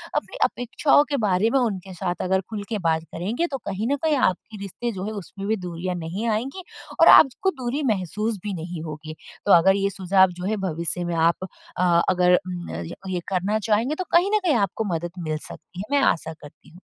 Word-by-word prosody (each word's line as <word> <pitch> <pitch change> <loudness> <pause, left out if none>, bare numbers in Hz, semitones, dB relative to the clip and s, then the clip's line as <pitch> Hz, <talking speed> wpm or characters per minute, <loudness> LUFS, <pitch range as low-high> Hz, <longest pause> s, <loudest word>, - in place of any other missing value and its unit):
अपनी - - -2
अपेक्षाओं 260 +4 +2
के 285 - 0
बारे 195 +3 +2
में - - +5
उनके 195 -6 -2
साथ 180 0 -3
अगर 190 +1 +1
खुल 210 -2 -4
के 225 - -1
बात 160 0 +1
करेंगे 220 - -1
तो 270 - -2
कहीं 200 +4 -2
न - - +3
कहीं 315 -2 +3
आपकी 210 +4 -8
रिश्ते 200 +5 -4
जो 190 -1 -5
है 215 - -3
उसमें 200 -1 -7
भी 220 - +2
दूरियाँ 175 +1 -4
नहीं 175 +7 -4
आएँगी 260 - -2 0.4
और - - +8
आपको 315 +7 +3
दूरी 255 +4 -2
महसूस 210 +3 -3
भी 205 - -2
नहीं 170 -1 -6
होगी। 155 0 -7 0.3
तो 205 - +3
अगर 190 +3 +6
ये 200 0 +1
सुझाव 190 0 +3
जो 180 - -4
है 215 +1 0
भविष्य 170 +2 -2
में 175 -1 -2
आप 165 +2 +2 0.4
अ, 175 -2 +4
अगर 180 0 +4
उम, 175 -1 -6 0.4
ये 180 - -1
करना 195 +3 0
चाहेंगे 230 +8 +2
तो 370 - -3
कहीं 355 +4 +4
न - - +4
कहीं 320 - +3
आपको 205 0 0
मदद 170 +1 -4 0.2
मिल 155 0 -1
सकती 175 - -11
है। 265 +8 -2
मैं 275 - +3
आशा 160 -1 0
करती 150 -2 -16
हूँ। 175 - -16
195 Hz, 215 wpm, -24 LUFS, 175-225 Hz, 0.4 s, और